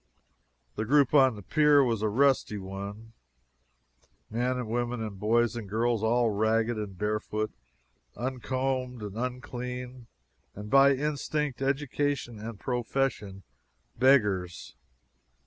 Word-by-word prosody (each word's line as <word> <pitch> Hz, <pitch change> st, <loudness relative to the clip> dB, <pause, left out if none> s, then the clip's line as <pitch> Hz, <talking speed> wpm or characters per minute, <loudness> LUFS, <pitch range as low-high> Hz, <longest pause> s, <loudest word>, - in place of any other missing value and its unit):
The 110 Hz, -, -1 dB
group 140 Hz, +2 st, +3 dB
on 130 Hz, -5 st, +5 dB
the 105 Hz, -, -10 dB
pier 150 Hz, -, +4 dB
was 115 Hz, -4 st, 0 dB
a 110 Hz, -, +1 dB
rusty 130 Hz, -2 st, +2 dB
one 100 Hz, +3 st, -7 dB, 1.2 s
men 125 Hz, +3 st, 0 dB
and 125 Hz, -3 st, -4 dB
women, 120 Hz, +1 st, -2 dB
and 105 Hz, -3 st, -5 dB
boys 115 Hz, +2 st, +2 dB
and 110 Hz, -4 st, -6 dB
girls, 115 Hz, +1 st, 0 dB
all 115 Hz, +1 st, +2 dB
ragged 110 Hz, +3 st, +1 dB
and 105 Hz, -3 st, -6 dB
barefoot, 105 Hz, +1 st, -2 dB, 0.7 s
uncombed 130 Hz, -1 st, -2 dB
and 105 Hz, -1 st, -6 dB
unclean, 125 Hz, 0 st, -5 dB, 0.5 s
and 105 Hz, +1 st, -8 dB
by 140 Hz, 0 st, +6 dB
instinct, 150 Hz, -1 st, -2 dB
education, 140 Hz, -3 st, -1 dB
and 110 Hz, -1 st, -7 dB
profession 120 Hz, -6 st, -2 dB, 0.5 s
beggars. 105 Hz, -9 st, +2 dB
120 Hz, 115 wpm, -28 LUFS, 105-130 Hz, 1.2 s, by